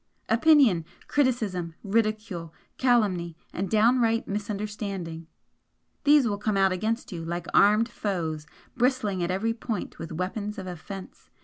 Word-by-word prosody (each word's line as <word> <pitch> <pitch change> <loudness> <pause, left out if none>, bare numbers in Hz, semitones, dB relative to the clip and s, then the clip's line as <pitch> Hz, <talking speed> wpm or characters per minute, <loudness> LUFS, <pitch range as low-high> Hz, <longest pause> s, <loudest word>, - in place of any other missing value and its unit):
Opinion, 235 - +5 0.2
criticism, 215 - 0
ridicule, 215 -6 -1 0.2
calumny 195 -10 +2 0.2
and 190 +1 -2
downright 230 +1 +3
misunderstanding 200 -5 -4 0.8
these 290 -3 +6
will 205 -2 -2
come 210 -1 0
out 195 -1 +4
against 220 +6 -2
you 170 -3 -5
like 170 +1 -4
armed 210 +3 +5
foes, 165 -9 -3 0.3
bristling 235 -7 +1
at 175 - -1
every 205 +5 0
point 230 -5 -5
with 165 0 -6
weapons 200 +5 -3
of 190 - -5
offence. 185 +2 -9
205 Hz, 125 wpm, -27 LUFS, 180-225 Hz, 0.8 s, these